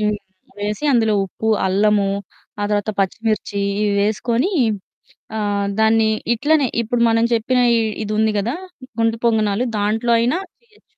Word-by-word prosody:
హ్మ్, 210 0 +1 0.4
వేసి 210 +7 -3
అందులో 220 -3 +3
ఉప్పు, 220 +4 -4 0.2
అల్లము 200 +1 +2 0.5
ఆ - - -1
తర్వాత 210 +1 0
పచ్చిమిర్చి 205 +1 -1 0.2
ఇవి 210 -1 +1
వేసుకొని, 230 - 0 0.9
ఆహ్, 205 -1 -1
దాన్ని 220 0 +4 0.2
ఇట్లనే 290 +3 +2
ఇప్పుడు 235 +1 -2
మనం 225 0 +2
చెప్పిన 250 +3 +1 0.4
ఇది 210 - -4
ఉంది 220 0 +2
కదా! 225 +6 -1 0.5
గుంత 225 0 +2
పొంగనాలు 220 0 +1
దాంట్లో 220 +3 0
అయినా 245 +9 +1 0.3
చేయొచ్చు. 435 -2 -28
220 Hz, 130 wpm, -19 LUFS, 205-235 Hz, 0.9 s, దాన్ని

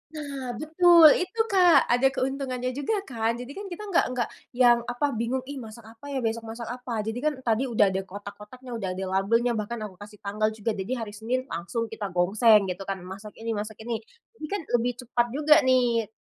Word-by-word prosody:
Nah 275 -5 -5
betul, 320 +3 +7
itu, 365 +5 -4
Kak. 360 -3 +6
Ada 245 +2 +4
keuntungannya 255 -2 -2
juga 285 - -1
kan. 230 - -1
Jadi 245 +3 -8
kan 400 +7 -7
kita 370 +2 -7
nggak 345 - +4
nggak 240 -2 0 0.3
yang 245 -1 +5
apa 250 +4 -1
bingung, 235 +3 -2
"Ih 275 +1 -7
masak 225 -1 -10
apa 225 +5 -13
ya, 275 -3 -3
besok 225 0 -2
masak 230 +1 -7
apa?" 245 -3 -4
Jadi 225 +3 -3
kan 305 +3 0
tadi 235 +3 +1
udah 215 -5 +3
ada 190 0 -1
kotak 200 +2 -9
kotaknya, 250 +5 -12
udah 225 -5 -3
ada 190 - -4
labelnya, 200 +6 +1
bahkan 220 0 -3
aku 190 -4 -9
kasih 205 0 -12
tanggal 210 +2 0
juga. 220 +1 -2
Jadi 190 +5 -4
hari 225 -4 -5
Senin 230 +5 -2
langsung 205 +7 -3
kita 215 -2 -4
gongseng 200 +2 +4
gitu 180 +2 -6
kan, 195 -1 -2
masak 195 +3 -9
ini 230 0 -4
masak 215 0 -4
ini. 230 0 -3 0.4
Jadi 310 - -5
kan 405 +4 -3 0.2
lebih 245 +2 -1
cepat 240 0 +1
juga 300 +1 +6
nih 240 -3 +3
235 Hz, 205 wpm, -26 LUFS, 215-260 Hz, 0.4 s, betul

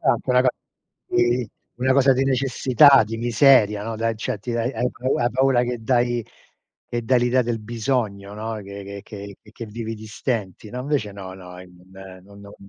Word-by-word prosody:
a 135 - +3
anche 120 +2 -3
una 125 0 +5
co 130 - +3 0.6
di 120 0 +1 0.3
una 130 +1 +2
cosa 135 -1 +5
di 130 +1 +1
necessità, 135 0 +5
di 115 +2 -5
miseria, 115 -3 +4
no, 115 0 -4
dai, 115 +1 0
accetti 110 +1 -5
dai, 120 +2 -1
e - - -13
hai 125 +1 0
pau 130 +2 -2
hai 120 0 +1
paura 130 -1 +2
che 120 -1 -3
dai 120 -1 +1 0.6
che 120 0 -3
dai 125 +1 +3
l'idea 125 +1 +2
del 115 -1 -2
bisogno, 110 -3 -2
no, 110 +2 -5
che 100 0 -8
che 100 -2 -9
che 105 - -18
che 115 - -8
vivi 115 +1 -6
di 110 0 -11
stenti, 105 -3 -4
no? 125 +1 -5
Invece 130 -7 -2
no, 95 -2 -9
no 90 -1 -11
e 90 - -11 0.6
non 100 +1 -16
no 100 0 -12
115 Hz, 200 wpm, -22 LUFS, 105-125 Hz, 0.6 s, una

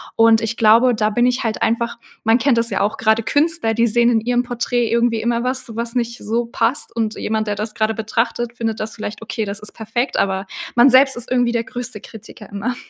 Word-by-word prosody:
und 225 0 +5
ich 225 0 -2
glaube, 230 +3 +5
da 215 0 +1
bin 240 +3 +1
ich 250 +1 0
halt 225 - +1
einfach 235 +1 -1 0.3
man 225 +1 +4
kennt 250 0 +2
das 230 0 +1
ja, 195 - -2
auch 205 +2 0
gerade 220 0 +2
Künstler, 295 -4 +1
die 230 +1 +2
sehen 235 +2 +3
in 225 -2 +2
ihrem 245 +2 0
Porträt 245 -1 -1
irgendwie 235 0 +1
immer 235 0 0
was, 250 -3 -3
was 235 +1 -3
nicht 235 -1 -2
so 230 +3 -2
passt 235 +3 -1
und 220 -2 -1
jemand, 220 0 -2
der 205 - -1
das 210 +1 -4
gerade 220 0 0
betrachtet, 230 +2 -2
findet 225 -2 -3
das 215 +1 -4
vielleicht 215 0 -6
okay, 225 0 -4
das 200 +1 -5
ist 210 - -8
perfekt, 235 +4 -3
aber 190 0 0 0.3
man 240 +3 +6
selbst 265 +1 +5
ist 240 - -5
irgendwie 245 -1 +2
der 235 -1 -1
größte 245 -2 -5
Kritiker 210 -1 -13
immer. 210 +5 -3
230 Hz, 230 wpm, -19 LUFS, 220-240 Hz, 0.3 s, man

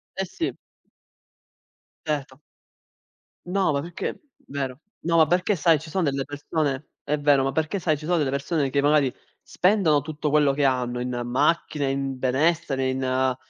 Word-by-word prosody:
Eh 190 - -1
sì. 190 - -4 1.5
Certo. 145 -3 -3 1.1
No, 185 -1 +1
ma 140 - 0
perché 170 +3 -5 0.3
vero. 135 -2 -4 0.2
No, 170 0 +1
ma 160 - +7
perché 180 +5 +2
sai 165 -1 +3
ci 160 +2 -10
son 185 +2 0
delle 140 -2 0
persone 145 -1 -2 0.2
è 150 +1 0
vero, 145 -2 +4
ma 135 - 0
perché 160 +5 -1
sai 155 -3 +1
ci 150 - -9
sono 175 +2 +2
delle 145 -4 +1
persone, 140 +1 0
che 140 +1 +1
magari 145 -2 +3 0.3
spendono 180 -6 +2
tutto 150 +1 -3
quello 145 -1 +4
che 140 +1 +1
hanno 125 -2 0
in 125 0 -3
macchine, 145 +2 +1
in 135 -1 -2
benessere, 135 +1 +1
in 130 0 0
145 Hz, 160 wpm, -24 LUFS, 135-160 Hz, 1.5 s, ma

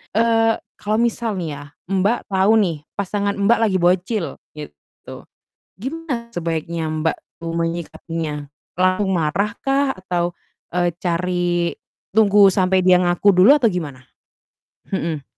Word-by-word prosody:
eee, 225 0 +3 0.2
kalau 210 +1 -1
misal 235 -2 -1
nih 175 -4 -3
ya, - - -9 0.3
Mbak, 200 +4 0
tahu 190 +2 +3
nih 170 -5 -1 0.2
pasangan, 200 +1 -1
Mbak, 205 +4 +3
lagi 220 -4 +2
bocil 180 +3 +1 0.3
gitu, 110 - -12 0.7
gimana 265 -3 -4
sebaiknya, 165 -3 -3
Mbak, 155 +1 -1 0.2
tuh 165 0 -4
menyikapinya? 165 -2 -4 0.3
Langsung 185 +2 +2
marah 170 +7 0
kah? 270 -2 +1
Atau, 175 -1 -2 0.3
e 175 -1 0
cari 175 -1 0 0.4
tunggu 205 -1 +6
sampai 185 -1 +2
dia 180 -1 +6
ngaku 180 +3 +3
dulu 205 +11 +7
atau 255 -5 +3
gimana? 145 -8 -5 0.9
Mhm. 160 -6 -2
185 Hz, 125 wpm, -20 LUFS, 170-210 Hz, 0.9 s, dulu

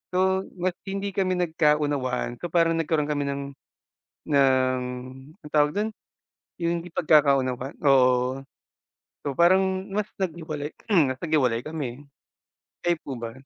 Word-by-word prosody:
So 190 +1 +2
mas 185 0 0 0.2
hindi 195 +1 -2
kami 190 -1 0
nagkaunawaan 150 -7 0
so 175 - -4
parang 165 -1 +2
nagkaroon 155 -2 0
kami 145 -1 -1
ng, 140 0 -2 0.9
ng 130 -2 +3 0.6
anong 150 - -11
tawag 150 -1 +3
do'n? 215 +2 0 0.7
Yung 170 0 -1
hindi 175 - -11
pagkakaunawan, 140 -5 +2
oo. 130 -1 +3 0.8
So 140 - -1
parang 190 +4 +3
mas 205 +1 -1 0.2
naghiwalay 155 -5 -3 0.4
mas 130 - -3
naghiwalay 130 -8 +2
kami, 145 -4 -5 0.8
kayo 175 -1 +2
po 135 - -4
ba? 115 -1 -5
150 Hz, 125 wpm, -25 LUFS, 135-175 Hz, 0.9 s, ng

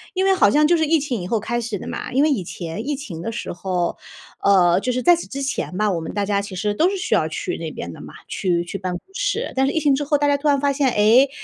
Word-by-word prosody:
因 375 - +1
为 390 - +5
好 375 - +4
像 300 +1 +4
就 345 - +4
是 320 -1 +2
疫 320 +1 +3
情 255 -8 -3
以 175 - -5
后 225 +1 0
开 240 +3 -2
始 225 -3 -3
的 - - -8
嘛。 - - -5
因 270 +3 +3
为 310 - +4
以 225 -11 0
前 170 +6 -6
疫 290 -1 -1
情 175 - -7
的 225 - -3
时 230 - -5
候 180 -1 -2 0.5
呃， 180 -3 +5
就 255 - -1
是 250 +1 -1
在 350 -1 +6
此 340 - -6
之 275 0 -5
前 265 -8 -3
吧， 210 0 +2
我 170 -2 -2
们 160 - -6
大 205 -1 -1
家 200 0 +1
其 200 -2 -8
实 205 +2 -1
都 330 - +3
是 395 - -3
需 365 - 0
要 - - +2
去 - - -3
那 - - -5
边 - - -7
的 - - -11
嘛， - - -11
去 175 -3 0
去 195 - -5
办 185 -1 -4
公 175 - -4
室。 - - -2
但 265 0 +3
是 275 - +1
疫 320 - +1
情 285 -3 +3
之 290 - -2
后 290 +1 +2
大 290 0 +1
家 285 - +3
突 300 - -2
然 280 -1 +3
发 280 0 +1
现： 275 -2 +2
“诶， 230 +6 +5
245 Hz, 335 characters per minute, -21 LUFS, 195-290 Hz, 0.5 s, 在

